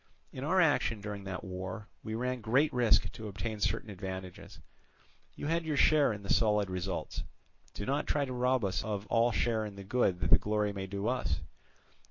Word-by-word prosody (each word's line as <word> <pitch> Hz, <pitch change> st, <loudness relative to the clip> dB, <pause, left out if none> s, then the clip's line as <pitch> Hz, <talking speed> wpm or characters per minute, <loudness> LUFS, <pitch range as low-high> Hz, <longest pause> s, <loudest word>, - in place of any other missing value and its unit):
In 130 Hz, -, -5 dB
our 185 Hz, +6 st, +3 dB
action 145 Hz, -, +3 dB
during 100 Hz, -1 st, -6 dB
that 95 Hz, -1 st, -5 dB
war 95 Hz, +3 st, -6 dB, 0.2 s
we 110 Hz, -, -4 dB
ran 125 Hz, +1 st, -2 dB
great 130 Hz, +8 st, +2 dB
risk 120 Hz, -3 st, +3 dB
to 110 Hz, -, -7 dB
obtain 105 Hz, +2 st, -4 dB
certain 110 Hz, +1 st, -1 dB
advantages: 95 Hz, -1 st, -7 dB, 0.8 s
you -, -, -6 dB
had 165 Hz, +2 st, +1 dB
your 155 Hz, -3 st, -1 dB
share 150 Hz, -3 st, +5 dB
in 105 Hz, -1 st, -6 dB
the 100 Hz, -, +1 dB
solid 105 Hz, -3 st, +2 dB
results, 90 Hz, +1 st, -3 dB, 0.5 s
do 100 Hz, -, -4 dB
not 140 Hz, +5 st, 0 dB
try 145 Hz, -1 st, +1 dB
to 130 Hz, -, -5 dB
rob 125 Hz, -2 st, +2 dB
us 95 Hz, -, -1 dB
of 105 Hz, -2 st, -3 dB
all 115 Hz, +1 st, +4 dB
share 110 Hz, -1 st, +1 dB
in 105 Hz, -2 st, -6 dB
the 100 Hz, -, -8 dB
good 95 Hz, -3 st, +1 dB
that -, -, 0 dB
the -, -, +8 dB
glory 105 Hz, -1 st, 0 dB
may 95 Hz, -1 st, -4 dB
do 100 Hz, +2 st, -3 dB
us. 125 Hz, 0 st, 0 dB
110 Hz, 200 wpm, -32 LUFS, 100-125 Hz, 0.8 s, the